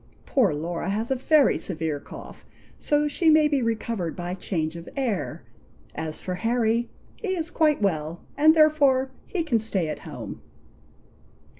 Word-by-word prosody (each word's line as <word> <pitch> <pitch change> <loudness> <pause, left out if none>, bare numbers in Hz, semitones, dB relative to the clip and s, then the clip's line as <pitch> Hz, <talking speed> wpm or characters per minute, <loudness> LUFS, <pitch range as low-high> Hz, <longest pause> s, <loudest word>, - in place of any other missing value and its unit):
Poor 240 - +3
Laura 170 +4 -3
has 220 +5 -1
a - - +3
very 280 +2 +3
severe 160 -4 -3
cough, - - -11 0.4
so 295 0 +2
she 320 +3 +2
may 310 -1 +6
be 285 -3 +1
recovered 225 -6 -2
by 175 0 -4
change 165 -3 -2
of 170 0 -8
air. 240 -8 -2 0.5
As 160 -1 -4
for 185 - -4
Harry, 230 +3 +1 0.3
he 390 -5 -2
is 335 -1 -3
quite 305 -9 +2
well, 160 -3 -1
and 310 +2 +6
therefore 285 -4 +4 0.2
he 360 -5 -1
can 245 -8 +1
stay 195 -7 -1
at - - -4
home." 135 -8 -8
230 Hz, 155 wpm, -25 LUFS, -, 0.5 s, may